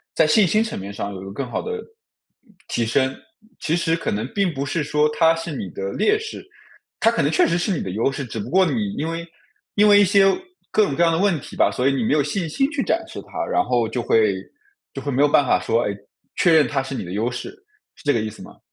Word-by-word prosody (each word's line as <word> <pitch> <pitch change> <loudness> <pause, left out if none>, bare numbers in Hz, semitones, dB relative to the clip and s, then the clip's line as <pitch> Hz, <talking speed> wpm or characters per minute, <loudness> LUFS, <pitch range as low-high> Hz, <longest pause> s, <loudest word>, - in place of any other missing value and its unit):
在 160 - +4
信 195 +5 +4
心 215 +6 +2
层 225 - -5
面 100 +1 -7
上 100 0 -4
有 95 - -8
一 - - -9
个 95 - -7
更 135 +6 -3
好 - - -2
的， - - -5
呃， 445 - -5 0.8
提 115 - -1
升。 130 +3 +1 0.4
其 160 - -2
实 165 -1 +1
可 165 - -3
能 110 +4 -2
并 195 -4 +1
不 140 0 -3
是 150 +2 -1
说 150 +1 +2
它 165 -1 +5
是 165 +1 -5
你 95 - -5
的 95 +2 -5
劣 425 +1 +2
势 445 0 -8 0.5
它 225 - +4
可 230 - 0
能 145 +3 +1
确 160 - +3
实 170 - +1
是 175 +4 -1
你 175 - -1
的 95 - -4
优 115 +8 0
势， 135 0 -5
只 115 -1 -7
不 100 - -5
过 190 +2 +4
你 210 0 -1
因 155 - -2
为 165 +1 -4 0.5
因 210 +1 +5
为 205 0 +7
一 - - +6
些 200 +1 +4 0.5
各 215 - +4
种 145 - -1
各 165 - -1
样 170 - +5
的 165 - +1
问 190 -4 +2
题 - - -11
吧， - - +3
所 125 +2 0
以 140 - +3
你 130 - 0
没 110 - 0
有 150 - +3
信 160 +4 -2
心 270 - +1
去 285 -3 -2
展 - - 0
示 - - -8
它， - - -5
然 360 - +1
后 120 - +1
就 120 +2 -3
会 110 -4 +3 0.6
就 135 - -6
会 145 - -4
没 135 0 +1
有 145 - +6
办 145 - +4
法 - - +3
说， 115 +1 0
诶， 100 - -2 0.4
确 175 - +3
认 155 -2 +5
它 135 -2 -1
是 135 +1 -6
你 100 - -4
的 90 - -7
优 115 +5 -1
势， 120 - -5 0.5
是 - - -18
这 145 - +2
个 115 - +1
意 110 0 -2
思 - - -12
吗？ - - -14
150 Hz, 300 characters per minute, -22 LUFS, 120-180 Hz, 0.8 s, 为